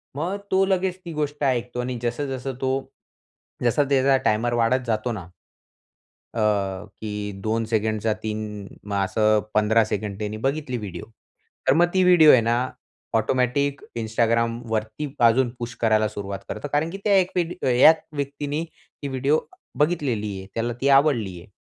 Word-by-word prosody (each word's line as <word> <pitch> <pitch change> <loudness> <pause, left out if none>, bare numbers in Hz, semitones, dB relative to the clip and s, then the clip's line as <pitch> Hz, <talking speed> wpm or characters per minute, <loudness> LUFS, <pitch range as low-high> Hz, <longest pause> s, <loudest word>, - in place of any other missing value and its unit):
मग 175 +7 -2
तो 190 0 +4
लगेच 190 -1 0
ती 170 - -6
गोष्ट 150 -1 -3
ऐकतो 125 -2 0
आणि 125 0 -3
जसं 120 +5 -1
जसं 135 +1 -5
तो 130 -1 +1 0.9
जसं 120 +4 +3
त्याचा 135 0 +4
टायमर 115 +3 +2
वाढत 120 +2 +2
जातो 110 +2 0
ना 95 -7 -6 1.1
अ, 100 -3 0
की 105 -1 -4
2 110 +2 0
सेकंडचा 110 -1 0
3 105 -2 -4 0.4
असं 110 +2 +2
15 110 +1 +4
सेकंड 105 -2 -3
त्यांनी 105 0 -3
बघितली 135 -3 -2
व्हिडिओ 105 -5 -7 0.6
तर 135 - +6
मग 175 +3 +4
ती 185 - +4
व्हिडिओ 175 -4 +7
आहे 125 - +6
ना, 115 +1 +1 0.6
ऑटोमॅटिक 130 +5 +1 0.2
Instagramवरती 115 +3 -1
अजून 120 +2 +3
पुश 120 0 -5
करायला 110 -1 +3
सुरुवात 100 -2 -5
करतो - - -4
कारण 150 +3 +1
की 190 - -6
एक 190 -2 +4
वेड 175 -1 0 0.2
या 145 +6 +8 0.2
व्यक्तीने 145 +2 -3
ती 145 -3 -12
व्हिडिओ 135 +3 +1 0.4
बघितलेली 140 -10 0
आहे. 95 - -10
त्याला 115 +1 -1
ती 140 - +2
आवडली 135 - +3
आहे. 85 - -14
120 Hz, 150 wpm, -24 LUFS, 110-145 Hz, 1.1 s, या